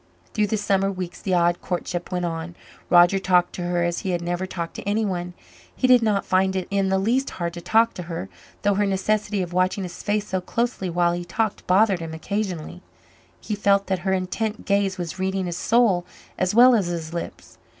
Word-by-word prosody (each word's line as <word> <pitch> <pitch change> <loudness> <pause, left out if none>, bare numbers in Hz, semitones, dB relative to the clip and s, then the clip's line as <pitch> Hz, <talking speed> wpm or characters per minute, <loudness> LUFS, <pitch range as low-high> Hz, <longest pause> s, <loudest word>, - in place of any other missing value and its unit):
Through 210 -2 +1
the 220 - 0
summer 195 -1 +1
weeks 185 -2 -6
the 185 -2 0
odd 175 0 +2
courtship 175 -1 -4
went 180 -1 -1
on. 165 0 -4 0.3
Roger 175 +2 +6
talked 180 -2 +2
to - - -5
her 175 0 0
as 170 0 -1
he 195 - -4
had 175 -1 -1
never 175 +2 -2
talked 170 -3 -5
to - - -5
anyone. 185 -5 -1 0.4
He - - 0
did 250 -1 +6
not 210 -3 +1
find 190 0 +2
it 185 -1 -2
in 195 -1 +1
the 190 - +2
least 240 +8 +1
hard 170 -1 -4
to 175 - -7
talk 225 +6 +3
to - - -6
her, 165 - -4 0.4
though 205 0 +3
her 205 +1 +1
necessity 200 +1 0
of 175 0 -7
watching 185 +2 +1
his 175 -1 -7
face 210 0 0
so 190 -2 -2
closely 230 -1 -2
while 175 0 +2
he 175 0 -3
talked 215 +5 -2
bothered 195 0 +4
him 165 -1 -6
occasionally. 180 -1 -4 0.6
He 215 - -5
felt 200 -1 +2
that 190 -1 -1
her 190 +2 -1
intent 210 +4 -2
gaze 200 -1 +1
was 175 0 -5
reading 190 0 -1
his 175 -1 -4
soul 220 -6 +3 0.3
as 185 +2 0
well 250 +2 +8
as 205 -6 +2
his 165 -2 -4
lips. 170 - -7
190 Hz, 210 wpm, -23 LUFS, 175-205 Hz, 0.6 s, well